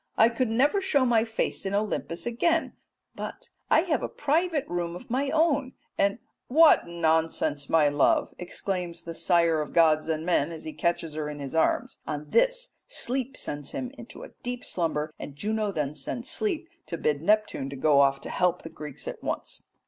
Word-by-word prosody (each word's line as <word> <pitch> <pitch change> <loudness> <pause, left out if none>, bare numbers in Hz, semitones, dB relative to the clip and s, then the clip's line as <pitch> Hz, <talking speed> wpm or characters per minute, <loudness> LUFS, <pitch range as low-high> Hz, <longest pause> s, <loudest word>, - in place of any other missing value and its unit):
I 225 - +7
could 240 0 -1
never 280 - +3
show 285 -9 +2
my 230 -3 +4
face 225 -1 -2
in 195 +1 -1
Olympus 200 -5 -2
again, 325 +8 +1 0.4
but - - -7 0.2
I - - +6
have 335 -3 0
a - - -3
private 310 +1 0
room 175 -1 -2
of 230 +6 -10
my 275 +3 +1
own 290 -4 +2 0.2
and" 200 +2 +2 0.3
"What 310 - +6
nonsense, 160 -3 0
my 160 -2 +5
love!" 145 -1 +2
exclaims 180 -1 -3
the 170 - -6
sire 170 -2 +2
of 150 - -6
gods 155 -2 +4
and 160 0 -1
men 170 -3 +2
as 160 -1 -8
he 155 - -6
catches 170 -2 -1
her 150 -1 -3
in 150 - -6
his 140 -2 -6
arms. 160 - +1
On 150 -1 -4
this - - +2 0.2
Sleep 265 - -2
sends 145 -1 -3
him 255 -1 -4
into 235 -3 -11
a - - -9
deep 245 0 -4
slumber, 155 -3 -1
and 140 - -7
Juno 210 +6 -1
then 150 -5 -2
sends 240 - -5
Sleep 365 -6 -1 0.2
to 170 - -4
bid 150 -2 0
Neptune 210 -7 +1
go 140 +1 +3
off 135 -1 +4
to - - -6
help 180 -1 +1
the 165 - -8
Greeks 150 -3 -8
at - - -6
once. - - -4
175 Hz, 185 wpm, -27 LUFS, 155-255 Hz, 0.4 s, I